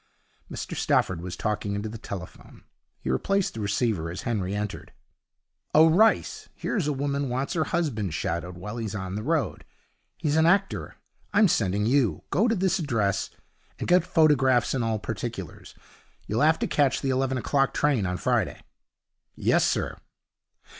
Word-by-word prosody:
Mr - - -5
Stafford 90 -3 +1
was 90 0 -5
talking 105 -2 -2
into 100 +2 -3
the 110 +1 -7
telephone. 95 -4 -9 0.4
He 65 - -2
replaced 195 - 0
the 115 - -7
receiver 100 -4 0
as 90 +3 -6
Henry 100 -4 -1
entered. 105 -1 -5 0.8
'Oh, 160 +1 +7
Rice, 220 +7 +2
here's 190 -10 -2
a - - +1
woman 140 0 -1
wants 130 +3 -2
her 160 -2 +1
husband 110 - -1
shadowed 85 +3 -3
while 105 +6 -6
he's 110 -3 -4
on 95 -2 -4
the 105 - -3
road. 155 +4 -1 0.5
He's 155 -1 0
an 160 +1 +5
actor. 195 +3 +1 0.4
I'm 215 - +6
sending 105 - +1
you. 125 -2 +2
Go 215 +6 +3
to 230 - +2
this 190 -1 +1
address, 115 - 0 0.5
and - - -4
get 180 -1 +5
photographs 135 -8 +3
and 130 -3 0
all 115 -1 0
particulars. 105 - -6 0.5
You'll 110 +4 -1
have 160 +2 +5
to - - -1
catch 140 -3 +2
the 135 - 0
eleven 130 0 0
o'clock 135 +2 +1
train 135 -10 +1
on 90 0 -2
Friday.' - - 0 0.8
'Yes, - - +2
sir.' - - -1
125 Hz, 160 wpm, -26 LUFS, 100-155 Hz, 0.8 s, Oh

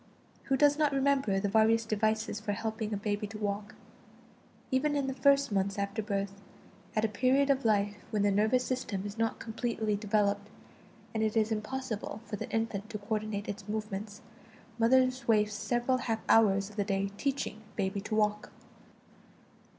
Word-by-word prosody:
Who 270 - +1
does 290 +1 +4
not 295 -2 +3
remember 270 -7 +2
the 200 - 0
various 220 +2 +3
devices 215 0 0
for 210 -1 -2
helping 220 0 -3
a 205 - -1
baby 205 0 -2
to 215 +1 -8
walk? 205 0 -3 1.0
Even 290 +3 +2
in 280 -1 +1
the 265 - -2
first 280 -1 +3
months 195 0 0
after 200 +2 -2
birth, 200 -1 -3 0.5
at 215 0 +2
a - - +3
period 260 +6 +3
of 270 -2 0
life 205 -1 +2
when 210 -2 0
the 205 - +3
nervous 220 +5 +3
system 205 -6 -2
is 205 +2 -6
not 225 0 0
completely 225 -2 -2
developed, 205 -1 0 0.6
and 220 - -1
it 220 0 +1
is 220 0 +2
impossible 220 -1 -3
for 210 - -4
the - - -6
infant 225 -2 -2
to 220 - -4
coordinate 210 -1 -3
its 205 0 -6
movements, 210 -1 -4 0.6
mothers 255 +2 +3
wasted 210 -2 +3
several 240 +4 0
half 225 -2 -2
hours 200 -2 +4
of 210 - -16
the 205 - +2
day 195 0 -1
"teaching 270 -6 -2
baby 195 +1 -1
to 215 +1 -3
walk." 210 -1 +1
215 Hz, 170 wpm, -31 LUFS, 205-235 Hz, 1.0 s, does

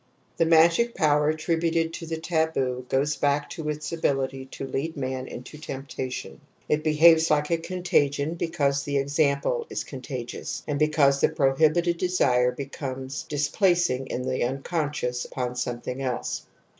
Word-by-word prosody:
;\J - - -39
( - - -38
The - - -1
magic 170 +9 +5
power 150 -3 +3
attributed 165 +1 0
to 165 - -6
taboo 160 -7 -1
goes 145 +3 +1
back 145 0 0
to 160 -3 -4
its 150 0 -4
ability 135 -4 -1
to 135 - -7
lead 150 +4 -3
man 130 -1 -3
into 130 +5 -9
temptation^ 135 -3 -6 0.3
it 150 0 +1
behaves 160 +1 +6
like 150 +1 +2
a 165 - +2
contagion, 165 -4 0
because 155 -5 0
the 140 0 -1
example 140 - +1
is - - -3
contagious, 130 -2 -6
and 145 -1 -2
because 150 -3 +3
the - - +5
prohibited 160 +4 +2
desire 130 -9 +3
i - - -13
becomes 135 -1 -5
di 150 - -3
splacing 150 -4 +2
in 125 - -3
the 130 0 -1
unconscious 135 -1 -2
uponl^ 125 -1 -2
something 125 +1 -4
else. 125 -2 -3
145 Hz, 155 wpm, -26 LUFS, 135-160 Hz, 0.3 s, behaves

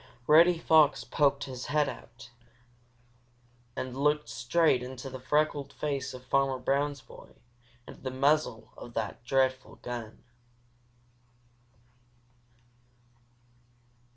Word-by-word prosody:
Reddy 165 +4 +6
Fox 155 -3 +4
poked 140 -2 +1
his 130 -2 -7
head 150 0 +2
out 120 -1 -10 1.4
and 130 -1 -5
looked 150 -1 +1
straight 125 +5 +2
into 130 +1 -7
the 130 - -7
freckled 145 +1 0
face 140 -3 -3
of 130 0 -12
Farmer 135 0 +1
Brown's 140 +2 -1
boy - - -15 0.5
and - - -11
the 130 - -3
muzzle 135 -2 0
of 120 - -11
that 110 +1 -4
dreadful 130 +1 0
gun! 120 -3 -7
135 Hz, 100 wpm, -29 LUFS, 125-150 Hz, 1.4 s, Reddy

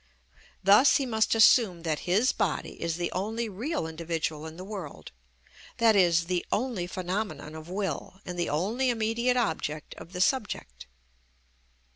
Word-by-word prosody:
Thus 205 +8 +6
he 275 - -1
must 220 -2 +1
assume 215 -6 +5
that 160 +1 -2
his 215 +8 +3
body - - -2
is 165 -1 -1
the 175 0 -2
only 220 +5 -2
real 225 - -3
individual 160 -1 -3
in 160 +1 -10
the 185 - -7
world, 190 -7 -8 0.7
i.e., 210 -6 +5
the 170 +1 +1
only 220 -7 -1
phenomenon 185 -3 -4
of 160 +1 -9
will 190 -1 -4
and 180 - -5
the 175 - 0
only 215 - 0
immediate 235 +2 +1
object 155 -9 -2
of 175 - -12
the 180 - -5
subject. 185 - -1
185 Hz, 145 wpm, -28 LUFS, 165-225 Hz, 0.7 s, Thus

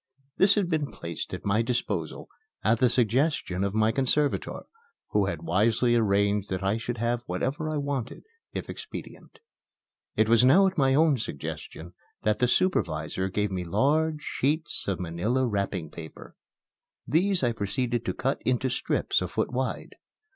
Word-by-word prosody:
This 200 +1 +5
had 205 -4 +1
been 155 -4 -1
placed 85 -1 -6
at - - -6
my 100 +3 +2
disposal 105 - -2 0.4
at 110 +2 +3
the 125 -1 +4
suggestion 120 - +1
of 100 +1 -1
my 110 0 +3
conservator, 135 +4 0 0.5
who 105 -2 +2
had - - -4
wisely 110 +6 +2
arranged 100 -2 +2
that 95 0 -3
I 100 +3 +1
should 120 +1 -4
have 120 +1 0
whatever 135 - -2
I 155 - -1
wanted, 140 -4 -3 0.3
if - - -5
expedient. - - -9 0.8
It 110 - +3
was 115 +1 +5
now 165 +10 +6
at 190 -1 +1
my 135 -3 +3
own 150 -3 +4
suggestion 80 0 -6 0.3
that 105 0 +1
the 125 - +3
supervisor 120 - 0
gave 105 +1 -1
me 90 -1 -2
large 150 - +1
sheets 150 +4 -1
of 100 -2 -1
manila 90 +10 0
wrapping 100 -6 -2
paper. 80 -2 -10 0.7
These 180 +5 +2
I 120 - +3
proceeded 120 +3 -1
to - - -1
cut 135 +2 -1
into 130 +1 +1
strips 125 - 0
a - - -1
foot - - -2
wide. 130 +1 -3
120 Hz, 160 wpm, -27 LUFS, 100-140 Hz, 0.8 s, now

